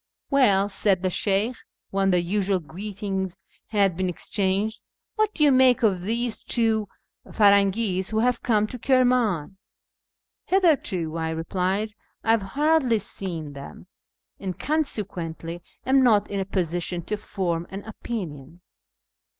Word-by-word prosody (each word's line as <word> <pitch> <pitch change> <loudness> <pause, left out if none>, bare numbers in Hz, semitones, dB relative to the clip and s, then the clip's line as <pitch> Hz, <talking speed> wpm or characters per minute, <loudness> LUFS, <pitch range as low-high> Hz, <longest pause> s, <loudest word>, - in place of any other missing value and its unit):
" - - -67
Well," 205 -8 +4
said 195 -2 +1
the 185 - +1
Sheykh, 210 +6 0 0.3
when 195 0 +2
the 180 -2 +2
usual 195 +1 0
greetings 190 +3 -5 0.3
had 200 -4 +2
been 185 +1 -1
exchanged, 200 +4 -1 0.2
" - - -66
what 435 -1 +2
do 305 - +2
you 290 - +6
make 255 -1 +5
of 195 -5 +3
these 230 +4 -1
two 220 -3 +2 0.4
Pirangis 200 -2 +3
who 220 - -2
have 240 +2 +2
come 215 -3 +2
to 250 +3 -7
Kirman? 245 - +2 0.3
" - - -68
" - - -63
Hitherto," 250 - +1
I 160 0 -1
replied, 185 +6 -1 0.2
" - - -46
I 225 - +3
have 225 -1 +3 0.2
hardly 295 -6 +3
seen 175 -7 -5
them, 140 +5 -10 0.5
and 190 -2 -5
consequently 175 - -3 0.2
am 265 +1 +4
not 215 -6 +3
in 200 - -1
a 190 - -1
position 175 -2 -2
to 210 - -2
form 180 -5 -3
an 195 +1 -7
opinion." 175 - -7
200 Hz, 150 wpm, -25 LUFS, 180-230 Hz, 0.5 s, you